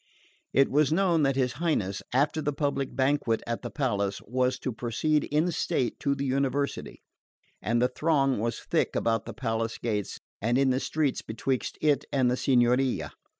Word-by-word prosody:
It 135 +2 +3
was 150 0 +3
known 170 -1 +3
that 135 -2 +2
his 125 -2 +1
Highness, 100 - 0
after 145 +5 +1
the 145 - 0
public 140 -3 -2
banquet 130 -3 +1
at 115 0 -3
the - - -5
palace, 100 -9 -1
was 125 +2 0
to 130 - -3
proceed 130 +7 0
in 155 +4 +1
state 130 -6 -1
to 140 -1 0
the 140 0 -3
University; 140 +1 -1 0.6
and 115 +4 +1
the 125 - +4
throng 135 -2 +1
was 115 +2 -2
thick - - 0
about 115 -2 0
the 115 - -5
palace 115 -1 -2
gates 105 -4 -3 0.2
and 120 +4 +1
in 135 -1 +3
the 130 - +1
streets 150 -1 -1
betwixt 125 +4 -3
it 145 -3 +2
and 130 -3 +2
the - - +2
Signoria. 125 0 +2
130 Hz, 175 wpm, -27 LUFS, 120-145 Hz, 0.6 s, the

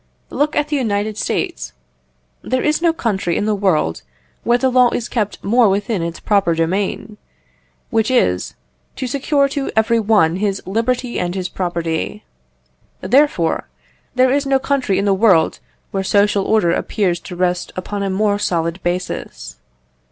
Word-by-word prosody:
Look 300 +1 0
at 295 0 0
the 300 - 0
United 215 -4 -1
States. 60 - -3 0.7
There 255 0 -1
is 300 +1 +1
no 340 -1 +4
country 200 - -1
in - - -1
the 215 - +1
world 175 - 0 0.4
where 240 +1 +3
the 260 +1 +1
law 250 -1 +5
is 235 - -3
kept 210 -4 -3
more 230 +1 +4
within 205 0 -1
its 170 0 -4
proper 195 -6 +2
domain 190 +5 -2 0.7
which 225 -1 +1
is, 90 - +1 0.4
to - - -4
secure 280 +2 +1
to 280 0 -3
every 225 +1 +3
one 205 -6 +3
his 195 -1 -1
liberty 240 +5 -1
and 175 0 -2
his 185 -1 -3
property. 175 +2 -3 0.8
Therefore, 215 - +2 0.5
there 255 0 +4
is 280 +1 +1
no 270 0 +3
country 265 -7 0
in 200 - 0
the 200 - +3
world 190 -5 +3 0.3
where 195 -1 -1
social 200 0 +2
order 215 -6 +2
appears 180 -1 0
to 180 - -9
rest 180 0 -1
upon 200 +2 -4
a 195 - -1
more 205 +1 +1
solid 170 -2 -1
basis. 175 - -4
205 Hz, 160 wpm, -18 LUFS, 180-245 Hz, 0.8 s, law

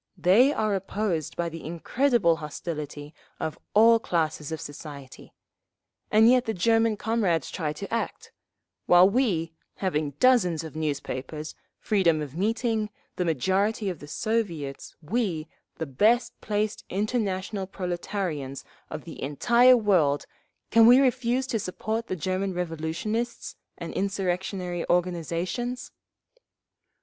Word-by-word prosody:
They 220 +10 +5
are 215 -7 0
opposed 195 -4 -2
by 170 -1 -1
the 165 0 -9
incredible 170 - +1
hostility 150 -1 -6 0.3
of 155 - -4 0.2
all 230 +2 +7
classes 160 -6 -1
of 160 - -3
society—and 145 - -4
yet 250 +1 +5
the 220 - -2
German 225 +3 +2
comrades 200 - 0
try 155 -4 -2
to 200 +8 -7
act; 230 - -3 0.6
while 175 +1 +7
we, 195 -8 0 0.2
having 150 -7 -2
dozens 180 -11 +4
of 160 -2 -9
newspapers, 150 0 -4 0.2
freedom 180 -7 +2
of 150 -2 -6
meeting, 220 +2 0 0.3
the 180 - 0
majority 190 - +1
of 170 - -9
the 145 - -10
Soviets, 165 -7 -3
we, 180 -4 -1 0.3
the 160 - -4
best 215 - +2
placed 210 0 -2
international 200 -1 -2
proletarians 175 -6 -4 0.2
of - - -6
the - - -10
entire 240 - +5
world, 175 -10 +2 0.5
can 230 0 +7
we 245 +2 +9
refuse 255 -1 +2
to 240 -4 -1
support 220 +4 -3
the - - -2
German 185 +3 -2
revolutionists 180 +8 -3 0.2
and 170 -1 -6
insurrectionary 185 -2 -2
organisations? 180 - -1
185 Hz, 120 wpm, -26 LUFS, 160-220 Hz, 0.6 s, we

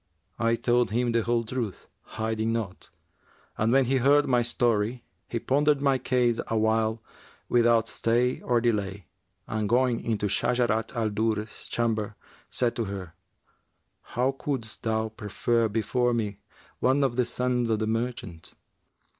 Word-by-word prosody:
I 115 0 +2
told 120 -1 +2
him 120 +3 +1
the 115 0 +2
whole 115 +1 +1
truth, 115 -3 -4 0.3
hiding 110 0 -1
naught, 110 -5 -4 0.7
and 110 +2 +1
when 135 +1 +4
he 135 +2 +2
heard 145 +3 +4
my 125 -2 +3
story, 120 0 0 0.2
he 115 - -3
pondered 145 +4 +2
my 135 -2 +2
case 125 -2 +1
awhile, 110 0 +1 0.4
without 115 -1 +3
stay 120 +3 +1
or 120 -1 +2
delay, 105 -5 -1 0.4
and 110 -2 -2
going 125 0 +2
into 110 -3 -1
Shajarat 115 +2 0
al 110 -2 0
Durr's 110 0 -2
chamber, 110 -3 -1 0.3
said 120 -2 0
to 115 - 0
her, 95 -4 -6 0.9
'How 125 +3 0
couldst 135 -5 -4
thou 110 0 0
prefer 115 +2 0
before 115 +3 +1
me 105 -3 -2 0.4
one 135 +2 +3
of 130 -3 +1
the 125 - +3
sons 125 0 0
of 110 - +2
the 110 - -1
merchants?' 110 -7 -4
115 Hz, 145 wpm, -27 LUFS, 110-125 Hz, 0.9 s, when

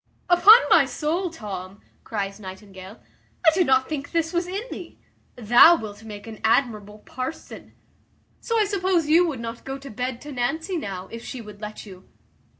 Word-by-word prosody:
"Upon 405 +6 +9
my - - +6
soul, 340 +5 -2
Tom," 200 - -8 0.2
cries 200 -2 -4
Nightingale, 190 0 -11 0.5
"I 320 - +8
did 360 0 +2
not 260 0 +3
think 285 -2 -5
this 330 -1 -1
was 345 0 0
in 390 +4 -4
thee. 355 - -9 0.4
Thou 245 +8 +7
wilt 215 -6 -8
make 210 -2 -9
an 225 -2 -10
admirable 215 -3 0
parson. 255 +5 -7 0.6
So 460 -1 -1
I 425 - +3
suppose 375 -4 0
you 345 +3 +5
would 285 -7 -4
not 230 0 -7
go 270 0 -5
to 275 -1 -11
bed 250 +2 -4
to 295 - -9
Nancy 315 +9 -2
now, 195 - -5
if 230 0 -8
she 260 - -7
would 210 -2 -11
let 210 +1 -7
you?" 190 -2 -14
245 Hz, 175 wpm, -24 LUFS, 210-330 Hz, 0.6 s, Upon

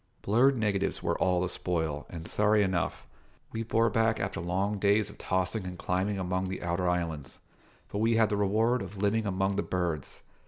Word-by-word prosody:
Blurred 125 +6 +4
negatives 105 -3 0
were - - +1
all 90 -1 +2
the 90 - 0
spoil, 80 -5 -2
and, 85 -1 -7
sorry 105 0 +3
enough, 95 -3 -1 0.5
we 110 - -3
bore 115 0 +2
back 115 -1 +2
after 95 - -2
long 95 +4 -1
days 100 +1 +2
of - - -17
tossing 95 +3 -1
and 90 -1 -6
climbing 95 +4 -1
among 95 0 -1
the 95 0 -4
Outer 85 +1 0
Islands; 85 -5 -3 0.5
but 100 - -4
we 115 +1 +3
had 110 -2 +4
the 105 - 0
reward 110 +5 +2
of 100 +1 -7
living 105 +2 +1
among 95 0 0
the - - +2
birds. 85 -7 -3
95 Hz, 190 wpm, -29 LUFS, 90-105 Hz, 0.5 s, Blurred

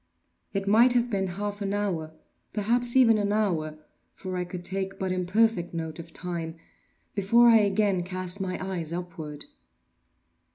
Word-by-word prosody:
It 195 0 -3
might 235 +5 +5
have 240 0 +1
been 195 -2 0
half 205 0 -4
an 200 0 -1
hour, 175 -7 -2 0.4
perhaps 235 +4 0
even 230 -4 +6
an 205 0 0
hour, 170 -8 0 0.4
(for 185 -1 -6
I 180 0 -1
could 175 0 -7
take 195 0 -2
but 190 -1 -2
imperfect 185 0 +1
note 160 -1 -4
of 165 0 -9
time) 170 -2 -4 0.6
before 230 +4 +4
I 230 - +8
again 200 -2 +2
cast 185 +1 -2
my 185 -1 -2
eyes 170 -4 -4
upward. 165 -4 -6
190 Hz, 155 wpm, -27 LUFS, 175-210 Hz, 0.6 s, I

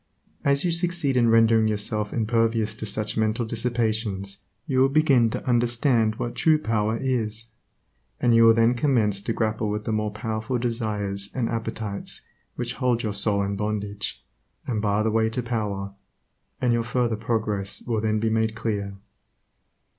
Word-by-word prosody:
As 140 +3 +2
you 175 - +2
succeed 170 -5 0
in 120 -2 +4
rendering 115 -1 +5
yourself 105 0 -1
impervious 115 -1 +1
to 110 0 -5
such 105 +1 -1
mental 110 +2 +1
dissipations 110 -4 -1 0.2
you 130 -3 0
will 135 +1 +5
begin 135 -6 +4
to - - -5
understand 120 -2 +2
what 120 +1 -4
true 160 -1 +3
power 110 -4 0
is, 115 -3 -1 0.7
and 120 -1 +3
you 115 0 +6
will 115 - +8
then 115 +1 +4
commence 115 -7 +1
to 105 - -3
grapple 110 -1 -1
with 105 0 -3
the - - -1
more 105 -1 0
powerful 110 +3 -3
desires 105 -5 -2
and 120 -3 0
appetites 110 -3 -3 0.3
which - - -3
hold 125 -1 0
your 105 -2 -2
soul 100 0 +1
in 100 0 -2
bondage, 105 0 -4 0.4
and 110 -4 -1
bar 105 0 +1
the 110 - +1
way 110 0 +2
to 120 +2 -3
power, 105 -4 -3 0.7
and 125 -2 +2
your 120 - +2
further 120 -1 0
progress 105 -3 -2
will 115 -3 -1
then 110 0 +1
be 110 0 0
made 110 0 +1
clear. 100 -3 -3
110 Hz, 165 wpm, -25 LUFS, 105-120 Hz, 0.7 s, will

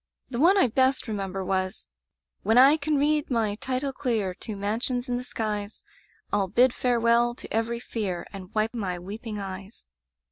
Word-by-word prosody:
The 240 - -3
one 360 +7 +6
I 385 - +6
best 260 +2 +2
remember 195 -3 -3
was: 185 0 -2 0.6
'^^When 225 +2 +3
I 270 +4 +8
can 305 -1 0
read 295 +1 +2
my 225 -5 +1
title 260 +5 -2
clear 220 -9 -1
To 215 +3 -6
mansions 230 +5 -1
in 245 -1 -1
the 250 - -4
skies, 210 -3 -4 0.5
ril 200 -2 +2
bid 245 +6 +4
farewell 240 -1 +2
to - - -9
every 230 +1 0
fear. 205 -7 -3
And 190 -1 -9
wipe 215 +2 +1
my 195 -6 -2
weeping 210 +5 -6
eyes. 195 +1 -7
225 Hz, 170 wpm, -26 LUFS, 200-250 Hz, 0.6 s, I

